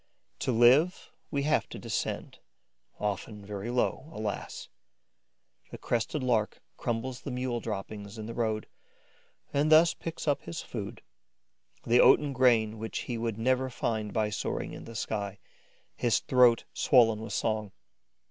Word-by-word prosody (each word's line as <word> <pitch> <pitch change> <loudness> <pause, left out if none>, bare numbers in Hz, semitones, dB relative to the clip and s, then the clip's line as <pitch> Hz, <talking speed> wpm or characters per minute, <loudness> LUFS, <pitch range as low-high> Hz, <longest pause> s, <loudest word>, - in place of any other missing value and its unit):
To - - 0
live, 130 +10 +4 0.2
we 140 -2 -1
have 155 +2 +1
to - - -7
descend, - - -3 0.6
often 105 0 -3
very 100 +2 -5
low, 125 +4 0
alas! 105 -7 -5 1.0
The - - -8
Crested 120 +4 -1
Lark 115 -4 +1 0.2
crumbles 120 +2 -3
the - - -6
mule 125 -1 -2
droppings 100 +1 -6
in 110 - -6
the 115 - -6
road 110 -2 -1 0.9
and 145 +2 +2
thus 160 +2 +7
picks 165 -1 -6
up 145 - +2
his 170 - -6
food, 110 0 -6 0.8
the 120 +1 +4
oaten 145 +2 +6
grain 115 -4 +3
which 110 0 -4
he 120 - -4
would 115 -2 -2
never 130 +3 +1
find 110 -3 -2
by 110 -1 0
soaring - - -3
in - - -9
the 115 - -10
sky, 100 -2 -3 0.6
his 120 -2 +2
throat 125 -3 +4
swollen 115 -4 +4
with 110 -2 -6
song. 110 -2 -1
115 Hz, 145 wpm, -29 LUFS, 110-130 Hz, 1.0 s, thus